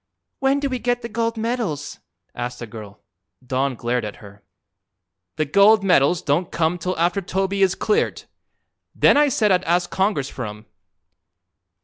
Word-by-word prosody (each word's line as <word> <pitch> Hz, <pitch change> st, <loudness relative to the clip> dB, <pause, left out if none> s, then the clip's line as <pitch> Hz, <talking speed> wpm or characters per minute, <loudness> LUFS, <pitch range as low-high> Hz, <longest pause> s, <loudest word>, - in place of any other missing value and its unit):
"When 270 Hz, +1 st, +2 dB
do 280 Hz, -, -1 dB
we 255 Hz, -2 st, -3 dB
get 245 Hz, 0 st, -1 dB
the 235 Hz, -, -5 dB
gold 230 Hz, 0 st, -2 dB
medals?" 220 Hz, -, -3 dB, 0.3 s
asked 120 Hz, 0 st, -5 dB
a 120 Hz, -, -5 dB
girl. 105 Hz, -2 st, -11 dB, 0.4 s
Don 130 Hz, +1 st, -1 dB
glared 120 Hz, +1 st, -2 dB
at 105 Hz, -, -5 dB
her. 100 Hz, -1 st, -15 dB, 0.9 s
"The 155 Hz, -, 0 dB
gold 200 Hz, +7 st, +5 dB
medals 175 Hz, -3 st, +3 dB
don't 155 Hz, +5 st, 0 dB
come 165 Hz, +2 st, 0 dB
till 185 Hz, +2 st, -3 dB
after 175 Hz, +4 st, +1 dB
Toby 195 Hz, +2 st, -2 dB
is 195 Hz, -1 st, +3 dB
cleared. 440 Hz, +2 st, 0 dB, 0.7 s
Then -, -, +5 dB
I 295 Hz, +1 st, +5 dB
said 220 Hz, -6 st, +2 dB
I'd 180 Hz, -, +3 dB
ask 175 Hz, +1 st, +1 dB
Congress 190 Hz, -8 st, 0 dB
for 125 Hz, -4 st, -6 dB
'em." 105 Hz, +1 st, -10 dB
180 Hz, 160 wpm, -22 LUFS, 135-220 Hz, 0.9 s, gold